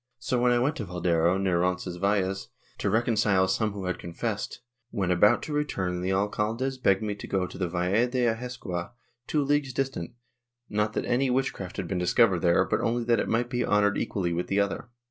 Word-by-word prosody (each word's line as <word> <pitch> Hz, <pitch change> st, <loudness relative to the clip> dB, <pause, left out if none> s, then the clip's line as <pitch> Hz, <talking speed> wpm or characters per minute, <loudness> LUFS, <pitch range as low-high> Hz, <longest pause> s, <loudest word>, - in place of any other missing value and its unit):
So, 125 Hz, -1 st, -1 dB
when 125 Hz, 0 st, +4 dB
I 120 Hz, -, +4 dB
went 135 Hz, +5 st, +1 dB
to 115 Hz, -, -3 dB
Valderro, 90 Hz, -1 st, +1 dB
near 95 Hz, -3 st, +1 dB
Roncesvalles, 95 Hz, +2 st, 0 dB, 0.3 s
to -, -, 0 dB
recon 115 Hz, +4 st, +2 dB
cile 100 Hz, -3 st, +3 dB
some 105 Hz, +2 st, 0 dB
who 100 Hz, -2 st, -5 dB
had 90 Hz, -1 st, -2 dB
confessed, 85 Hz, -1 st, -4 dB, 0.3 s
when 95 Hz, -5 st, -1 dB
about 90 Hz, +4 st, +4 dB
to 150 Hz, -, -5 dB
return 95 Hz, -12 st, -1 dB
the 90 Hz, -, -1 dB
alcaldes 110 Hz, +7 st, -1 dB
begged 100 Hz, -2 st, +3 dB
me 105 Hz, -1 st, -1 dB
to 100 Hz, -, -9 dB
go 95 Hz, -2 st, 0 dB
to -, -, -10 dB
the 90 Hz, -, 0 dB
Valle 90 Hz, +7 st, +1 dB
de 125 Hz, 0 st, 0 dB
Ahescoa, 115 Hz, -6 st, -3 dB, 0.3 s
two 150 Hz, -2 st, +1 dB
leagues 140 Hz, -2 st, +1 dB
distant, 135 Hz, -10 st, -3 dB, 0.5 s
not 105 Hz, +1 st, 0 dB
that -, -, -2 dB
any 130 Hz, +2 st, +1 dB
witchcraft 125 Hz, -7 st, -2 dB
had 95 Hz, -4 st, -3 dB
been 90 Hz, 0 st, -2 dB
discovered 95 Hz, +1 st, +3 dB
there, 85 Hz, +2 st, +3 dB
but -, -, 0 dB
only 120 Hz, +1 st, 0 dB
that 115 Hz, 0 st, +2 dB
it -, -, -1 dB
might 120 Hz, +2 st, 0 dB
be 125 Hz, -1 st, 0 dB
honored 105 Hz, 0 st, +2 dB
equally 90 Hz, -4 st, -1 dB
with 85 Hz, +1 st, -2 dB
the 100 Hz, -, +1 dB
other. 100 Hz, +4 st, -1 dB
100 Hz, 205 wpm, -27 LUFS, 90-120 Hz, 0.5 s, when